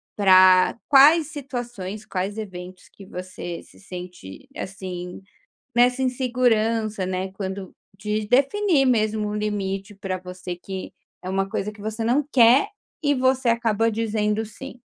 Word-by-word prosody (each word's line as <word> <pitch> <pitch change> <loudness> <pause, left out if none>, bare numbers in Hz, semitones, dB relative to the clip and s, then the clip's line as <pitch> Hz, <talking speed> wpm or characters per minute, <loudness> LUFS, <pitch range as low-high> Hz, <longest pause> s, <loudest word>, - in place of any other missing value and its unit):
pra 185 0 +6
quais 295 +3 +7
situações, 240 -8 -6
quais 195 +1 -3
eventos 185 -3 -8
que 195 - -14
você 180 -2 -7
se - - -20
sente, 180 - -10
assim, 185 -2 -6 0.5
nessa 250 +2 +4
insegurança, 230 -5 +1
né, 185 +1 -3
quando 190 -1 -6 0.2
de 210 +1 -2
definir 280 - +3
mesmo 215 -3 +1
o 210 - -3
limite 200 -1 -3
pra 195 -1 -4
você 180 0 -7
que 190 +1 -7 0.3
é 185 - -6
uma 195 0 -1
coisa 200 +2 -2
que 205 -1 -14
você 220 +2 -4
não 260 +5 +2
quer, 255 - +6 0.3
e 285 0 +3
você 260 -1 +2
acaba 230 -1 +1
dizendo 215 0 -1
sim? 250 +3 -10
210 Hz, 135 wpm, -23 LUFS, 190-245 Hz, 0.5 s, quais